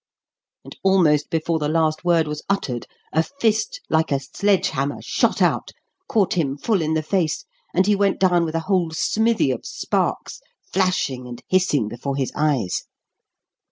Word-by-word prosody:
And -, -, -11 dB
almost 170 Hz, -6 st, +3 dB
before 165 Hz, 0 st, 0 dB
the 150 Hz, -1 st, -1 dB
last 155 Hz, 0 st, +1 dB
word 170 Hz, -3 st, +3 dB
was 150 Hz, 0 st, -4 dB
uttered 130 Hz, -12 st, -1 dB, 0.3 s
a 160 Hz, -, +4 dB
fist 280 Hz, -, -1 dB
like 160 Hz, -1 st, +1 dB
a 140 Hz, -, +2 dB
sledge 195 Hz, +8 st, +1 dB
hammer 140 Hz, +2 st, -2 dB
shot -, -, +1 dB
out, -, -, +1 dB, 0.4 s
caught 205 Hz, -5 st, +2 dB
him 145 Hz, -6 st, 0 dB
full 200 Hz, +4 st, 0 dB
in 160 Hz, 0 st, 0 dB
the 155 Hz, -, 0 dB
face, 165 Hz, -1 st, -1 dB, 0.3 s
and 185 Hz, -, +2 dB
he 205 Hz, 0 st, +3 dB
went 200 Hz, -1 st, +1 dB
down 180 Hz, -2 st, +3 dB
with 160 Hz, -1 st, -3 dB
a 165 Hz, -, 0 dB
whole 185 Hz, -4 st, +1 dB
smithy 220 Hz, -, +1 dB
of 125 Hz, -, -4 dB
sparks -, -, -2 dB, 0.3 s
flashing 175 Hz, -9 st, 0 dB
and 120 Hz, -1 st, -9 dB
hissing 180 Hz, -, +2 dB
before 125 Hz, +5 st, -4 dB
his 135 Hz, -2 st, -1 dB
eyes. 140 Hz, -11 st, 0 dB
160 Hz, 165 wpm, -22 LUFS, 145-190 Hz, 0.4 s, a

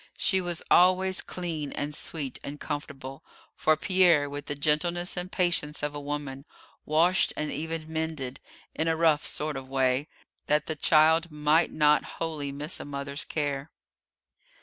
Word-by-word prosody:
She 190 Hz, -1 st, +2 dB
was 175 Hz, -2 st, -2 dB
always 185 Hz, +1 st, +4 dB
clean 165 Hz, -5 st, -4 dB
and 145 Hz, +1 st, -3 dB
sweet 145 Hz, -3 st, -2 dB
and 145 Hz, +1 st, -7 dB
comfortable, 135 Hz, -3 st, -6 dB, 0.3 s
for 155 Hz, 0 st, +2 dB
Pierre, 175 Hz, -4 st, +4 dB
with 145 Hz, 0 st, -6 dB
the 145 Hz, -, -2 dB
gentleness 165 Hz, +5 st, 0 dB
and 180 Hz, +1 st, -4 dB
patience 165 Hz, -5 st, 0 dB
of 150 Hz, 0 st, -1 dB
a 145 Hz, -, -5 dB
woman, 145 Hz, -2 st, -5 dB, 0.4 s
washed 170 Hz, +5 st, +3 dB
and 150 Hz, -, -2 dB
even 160 Hz, 0 st, -4 dB
mended, 160 Hz, -5 st, -4 dB, 0.3 s
in 160 Hz, -, -1 dB
a 165 Hz, -, +2 dB
rough 160 Hz, -3 st, +3 dB
sort 150 Hz, 0 st, -2 dB
of 135 Hz, -1 st, -6 dB
a 130 Hz, -, -19 dB
way, 130 Hz, +1 st, +1 dB, 0.4 s
that 150 Hz, 0 st, +2 dB
the 160 Hz, -, -3 dB
child 160 Hz, +2 st, +4 dB
might 150 Hz, +2 st, +2 dB
not 150 Hz, -1 st, +4 dB
wholly 155 Hz, -4 st, -3 dB
miss 150 Hz, +4 st, -3 dB
a -, -, -7 dB
mother's 140 Hz, +1 st, -4 dB
care. 145 Hz, -1 st, -2 dB
150 Hz, 160 wpm, -28 LUFS, 145-165 Hz, 0.4 s, always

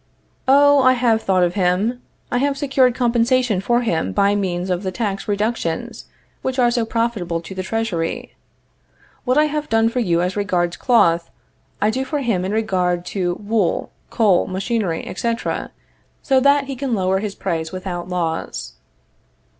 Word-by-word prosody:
Oh, 285 Hz, +1 st, +6 dB
I 255 Hz, 0 st, +5 dB
have 235 Hz, -3 st, +2 dB
thought 185 Hz, -3 st, +2 dB
of 175 Hz, 0 st, +1 dB
him. 200 Hz, +6 st, 0 dB, 0.3 s
I 245 Hz, -, +1 dB
have 280 Hz, +1 st, 0 dB
secured 265 Hz, -3 st, +2 dB
compensation 240 Hz, -3 st, +2 dB
for 240 Hz, +4 st, +1 dB
him 160 Hz, -, -1 dB
by 200 Hz, -, +3 dB
means 185 Hz, -2 st, -1 dB
of 180 Hz, 0 st, -1 dB
the 190 Hz, -2 st, -3 dB
tax 200 Hz, -1 st, -3 dB
reductions 205 Hz, -5 st, -2 dB, 0.4 s
which 260 Hz, 0 st, -3 dB
are 240 Hz, -2 st, +3 dB
so 235 Hz, -2 st, 0 dB
profitable 220 Hz, -8 st, -1 dB
to 180 Hz, -, -9 dB
the 190 Hz, -, -4 dB
Treasury. 190 Hz, -5 st, -3 dB, 0.9 s
What 255 Hz, +2 st, +2 dB
I 305 Hz, -, +5 dB
have 300 Hz, 0 st, -3 dB
done 225 Hz, 0 st, +3 dB
for 250 Hz, -, -2 dB
you 175 Hz, -7 st, +1 dB
as 180 Hz, +1 st, -2 dB
regards 180 Hz, -4 st, 0 dB
cloth, 170 Hz, -9 st, +2 dB, 0.5 s
I 210 Hz, +1 st, +2 dB
do 260 Hz, +3 st, -2 dB
for 280 Hz, +3 st, -3 dB
him 225 Hz, -8 st, 0 dB
in 190 Hz, -, -2 dB
regard 185 Hz, -5 st, 0 dB
to 180 Hz, -3 st, -1 dB
wool, 205 Hz, -3 st, 0 dB, 0.2 s
coal, 205 Hz, -6 st, +3 dB
machinery, 190 Hz, -2 st, -2 dB
etc., 230 Hz, +4 st, -3 dB, 0.5 s
so 265 Hz, -1 st, +3 dB
that 280 Hz, +1 st, +4 dB
he 275 Hz, 0 st, -6 dB
can 260 Hz, -2 st, -2 dB
lower 190 Hz, -1 st, +1 dB
his 205 Hz, -1 st, -4 dB
price 165 Hz, -4 st, -3 dB
without 185 Hz, -1 st, -5 dB
loss. 165 Hz, -, -3 dB
210 Hz, 165 wpm, -20 LUFS, 180-245 Hz, 0.9 s, Oh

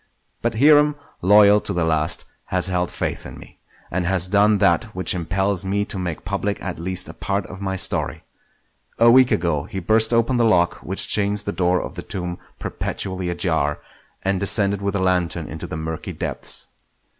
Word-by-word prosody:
But 115 Hz, -1 st, -1 dB
Hiram, 150 Hz, +2 st, +5 dB, 0.3 s
loyal 105 Hz, +2 st, +6 dB
to -, -, -1 dB
the 85 Hz, -, 0 dB
last, 80 Hz, -1 st, 0 dB, 0.2 s
has 90 Hz, 0 st, +1 dB
held 90 Hz, -1 st, 0 dB
faith -, -, -3 dB
in -, -, -9 dB
me, -, -, -15 dB, 0.3 s
and 90 Hz, +1 st, -1 dB
has 90 Hz, -1 st, +1 dB
done 105 Hz, +2 st, +4 dB
that 100 Hz, +4 st, +3 dB
which 95 Hz, -, 0 dB
impels 95 Hz, +2 st, 0 dB
me 100 Hz, +2 st, -1 dB
to 95 Hz, -, -2 dB
make 90 Hz, -3 st, -4 dB
public 100 Hz, +1 st, -2 dB
at 90 Hz, -3 st, -5 dB
least 90 Hz, +1 st, -2 dB
a -, -, -9 dB
part 100 Hz, 0 st, -2 dB
of 95 Hz, -, -10 dB
my 95 Hz, -1 st, -2 dB
story. 95 Hz, -, -1 dB, 0.7 s
A 115 Hz, 0 st, +6 dB
week 130 Hz, 0 st, +6 dB
ago 80 Hz, -4 st, 0 dB
he 95 Hz, +1 st, -5 dB
burst 110 Hz, +5 st, +3 dB
open 115 Hz, +2 st, +2 dB
the 120 Hz, -, +3 dB
lock 90 Hz, -6 st, +3 dB
which 95 Hz, -, -3 dB
chains 105 Hz, 0 st, 0 dB
the 100 Hz, -, -3 dB
door 90 Hz, -1 st, +1 dB
of -, -, -7 dB
the -, -, -6 dB
tomb 90 Hz, -2 st, -5 dB, 0.2 s
perpetually 95 Hz, -2 st, -4 dB
ajar, 80 Hz, -5 st, 0 dB, 0.5 s
and 95 Hz, -1 st, 0 dB
descended 100 Hz, 0 st, +1 dB
with 100 Hz, 0 st, -2 dB
a -, -, +1 dB
lantern 90 Hz, -3 st, 0 dB
into 80 Hz, -1 st, -6 dB
the -, -, -5 dB
murky 80 Hz, 0 st, -5 dB
depths. -, -, -2 dB
95 Hz, 190 wpm, -21 LUFS, 90-105 Hz, 0.7 s, loyal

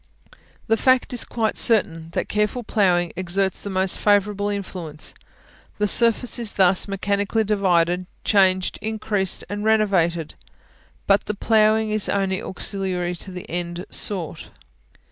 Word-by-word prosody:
The 225 Hz, 0 st, +2 dB
fact 255 Hz, +1 st, +2 dB
is 245 Hz, -, 0 dB
quite 220 Hz, -2 st, -2 dB
certain, 165 Hz, -8 st, +2 dB
that -, -, -2 dB
careful 210 Hz, +4 st, -1 dB
ploughing 180 Hz, -6 st, +1 dB
exerts 185 Hz, +1 st, -1 dB
the 200 Hz, -, -5 dB
most 190 Hz, -1 st, 0 dB
favourable 205 Hz, 0 st, +2 dB
influence: 180 Hz, -6 st, -5 dB, 0.6 s
the 210 Hz, -, +1 dB
surface 235 Hz, +3 st, +2 dB
is 230 Hz, -3 st, -1 dB
thus 190 Hz, 0 st, +3 dB
mechanically 200 Hz, +2 st, -1 dB
divided, 180 Hz, -4 st, +1 dB, 0.2 s
changed, 190 Hz, -2 st, +2 dB
increased, 210 Hz, -3 st, -2 dB
and 205 Hz, +2 st, -5 dB
renovated; 190 Hz, -7 st, +1 dB, 0.7 s
but 200 Hz, 0 st, +3 dB
the 210 Hz, -, -3 dB
ploughing 215 Hz, 0 st, +2 dB
is 215 Hz, -1 st, +2 dB
only 195 Hz, 0 st, 0 dB
auxiliary 185 Hz, -2 st, -2 dB
to 190 Hz, -, -8 dB
the 180 Hz, -1 st, -8 dB
end 175 Hz, +1 st, -4 dB
sought. 180 Hz, -7 st, -2 dB
200 Hz, 130 wpm, -22 LUFS, 180-215 Hz, 0.7 s, thus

